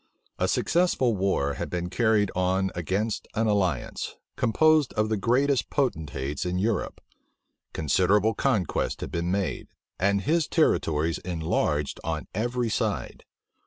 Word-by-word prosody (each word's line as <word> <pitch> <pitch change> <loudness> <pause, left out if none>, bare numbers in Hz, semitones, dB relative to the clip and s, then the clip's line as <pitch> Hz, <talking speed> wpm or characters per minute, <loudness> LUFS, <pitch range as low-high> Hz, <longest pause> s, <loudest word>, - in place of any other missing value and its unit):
A - - +2
successful 165 -9 +2
war 95 -8 0
had - - -4
been 90 0 -2
carried 110 -2 +2
on 95 +1 +1
against 100 +6 -2
an 115 - +1
alliance, 95 - -1 0.2
composed 155 +4 +3
of 110 0 0
the 110 - +1
greatest 125 +4 +1
potentates 75 - -2
in 90 0 -2
Europe. 105 +4 -1 0.7
Considerable 95 +8 +2
conquests 110 - 0
had - - -5
been 85 +1 -2
made, 95 -1 -2 0.3
and 100 +1 +2
his 155 +6 +1
territories 80 - +1
enlarged 80 -4 -1
on 80 -1 -3
every 120 +3 -1
side. 110 - -2
100 Hz, 125 wpm, -26 LUFS, 85-115 Hz, 0.7 s, composed